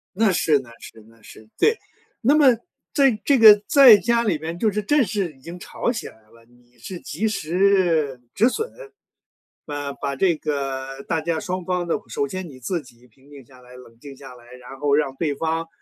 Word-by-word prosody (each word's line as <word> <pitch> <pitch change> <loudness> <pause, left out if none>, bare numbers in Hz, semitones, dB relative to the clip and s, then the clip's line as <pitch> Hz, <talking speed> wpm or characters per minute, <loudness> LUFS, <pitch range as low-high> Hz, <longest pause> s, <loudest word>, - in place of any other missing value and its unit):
那 215 0 +2
是 155 -4 +2
那 130 -3 -13
是 110 - -13
那 115 0 -23
是， 110 0 -15
对， 450 +1 +2 0.4
那 265 +4 +3
么 300 -2 +5 0.5
在 275 -4 +4
这 280 - +4
个 215 -3 +8
在 265 -7 +8
家 235 +3 +1
里 200 -8 0
边 160 +3 -6
就 215 +4 +1
是 210 +1 -2
正 290 +7 +2
式 190 -4 -3
已 135 - -24
经 170 +5 -10
吵 235 - -3
起 230 - -6
来 - - -14
了， 115 +2 -23
你 120 0 -27
是 175 +10 -9
及 190 +9 -3
时 175 - +1
止 220 +4 +3
损， 445 - -3 0.9
啊， 145 -1 -5
把 140 0 -4
这 170 +4 +2
个 135 -2 -4
大 165 -2 -2
家 165 +1 -2
双 185 +1 -5
方 180 -1 -2
的 165 - -1
首 115 +5 -2
先 185 +2 -6
你 135 -5 -13
自 170 +7 -3
己 125 -2 -20
平 130 +4 -25
静 140 -3 -14
下 130 +1 -19
来， 125 0 -16
冷 115 -2 -16
静 140 +1 -11
下 135 -1 -12
来， 120 0 -17
然 125 +1 -12
后 145 0 +2
让 145 -3 0
对 150 -2 -2
方， 165 +2 -2
160 Hz, 225 characters per minute, -22 LUFS, 130-195 Hz, 0.9 s, 个